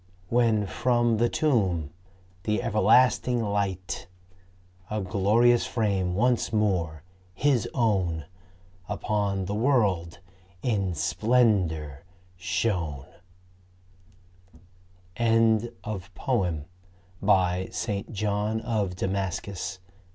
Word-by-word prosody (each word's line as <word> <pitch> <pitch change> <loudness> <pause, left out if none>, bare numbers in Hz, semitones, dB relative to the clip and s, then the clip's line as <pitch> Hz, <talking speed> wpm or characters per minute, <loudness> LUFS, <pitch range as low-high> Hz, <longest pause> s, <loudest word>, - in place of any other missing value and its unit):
When 115 -3 +2
from 120 +2 +1
the 120 +2 +2
tomb 95 - +1 0.5
the 105 +4 -1
everlasting 120 +2 +3
Light,. 100 -3 -2 0.8
A 105 - -2
glorious 105 +5 +3
frame 100 -6 0
once 120 +3 +1
more 90 -8 0 0.3
His 130 -2 +1
own, 95 - +1 0.6
Upon 100 -3 -1
the 100 - -3
world 105 -9 +1 0.5
in 100 -7 0
splendor 90 - +1 0.3
shone. 90 - -2 2.1
St. 115 -1 +3 2.4
John 105 +1 -1
of 105 -6 -1
Damascus. 95 0 -3
105 Hz, 70 wpm, -26 LUFS, 95-115 Hz, 2.4 s, everlasting